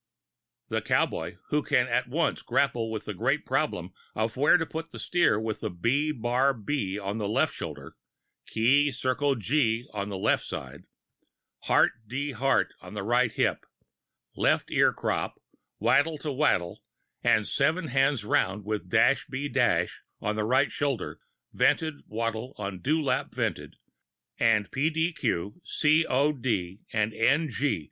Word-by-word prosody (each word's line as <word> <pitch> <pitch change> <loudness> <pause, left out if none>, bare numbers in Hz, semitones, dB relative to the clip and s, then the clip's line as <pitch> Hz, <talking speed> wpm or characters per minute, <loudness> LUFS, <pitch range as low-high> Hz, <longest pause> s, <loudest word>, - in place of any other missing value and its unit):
The - - -1
cowboy - - 0
who 150 - +2
can 130 -3 +2
at 125 0 0
once 160 +5 0
grapple 120 -5 0
with 110 -1 -5
the - - -4
great - - 0
problem - - -1 0.2
of 110 +1 -1
where 145 +6 +5
to 165 - -1
put 160 +1 -6
the - - -10
steer 170 -12 +2
with 110 -1 -4 0.2
"B 140 - +2
bar 130 +1 +1
B" 105 -4 -2
on 100 +2 -4
left 105 0 +1
shoulder, - - -7 0.5
"Key 140 +6 +3
circle 130 +2 0
G" 120 0 0
on 100 -1 -3
left 95 -2 +1
side, - - -7 0.8
"Heart - - +4 0.2
D 140 +5 -3
Heart" 135 +1 +1
on - - -10
right 120 +4 +1
hip, - - 0 0.7
left - - +1
ear - - +4
crop, - - -2 0.4
wattle 155 +2 +2
te 150 - -5
wattle, 130 - 0 0.4
and 105 - +3
seven 160 +4 +1
hands 135 -3 +2
round 100 -1 0
with 105 -3 -3
"Dash 115 +6 +3
B 140 +2 -3
Dash" 120 -11 +1 0.2
on 105 - -2
right 130 +6 +2
shoulder 140 -7 -2 0.3
"vented," 155 -3 +1
wattle 115 +3 -3
[Pg 105 - -6
20]on 95 - -10
dew 155 +3 +1
lap 140 - -1
vented, - - -2 0.6
and 110 -3 +2
"P. 145 +4 +1
D. 165 +2 0
Q.," 110 - -2
"C. 155 +2 +2
O. 140 +4 +2
D.," 105 -8 -2
and 110 0 0
"N. 145 +7 +2
G." 145 - 0
125 Hz, 150 wpm, -27 LUFS, 110-145 Hz, 0.8 s, where